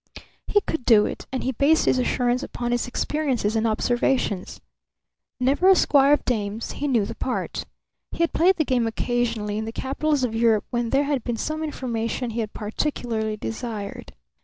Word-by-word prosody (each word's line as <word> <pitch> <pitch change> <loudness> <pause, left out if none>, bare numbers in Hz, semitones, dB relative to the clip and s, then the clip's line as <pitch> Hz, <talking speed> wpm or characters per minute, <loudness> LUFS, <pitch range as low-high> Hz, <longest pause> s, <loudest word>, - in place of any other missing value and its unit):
He 410 - +3
could 320 -8 -3
do 220 -3 +6
it; - - -6
and 260 - -2
he 260 - 0
based 285 +6 +3
his 255 - +3
assurance 250 0 +1
upon 240 -4 -4
his 240 +1 0
experiences 250 -5 -1
and 225 +1 +2
observations. 230 -2 0 0.8
Never 280 +9 +3
a 385 - +8
squire 280 -4 +5
of 295 - +1
dames, 215 -2 -2
he 290 - -3
knew 235 -7 +2
the 230 - -5
part. 250 +2 -3 0.5
He 335 - 0
had 335 - 0
played 365 +4 +4
the 315 - 0
game 245 -4 +1
occasionally 225 -3 -1
in 220 - -3
the 225 - -4
capitals 275 +3 -1
of 240 -3 0
Europe 225 -2 +2
when 240 -1 -1
there 275 +3 +3
had 280 -4 -1
been 240 -2 -2
some 310 +6 -3
information 240 -4 -3
he 230 - -4
had 215 -2 -2
particularly 220 -1 -2
desired. 220 -2 -6
245 Hz, 185 wpm, -24 LUFS, 225-275 Hz, 0.8 s, a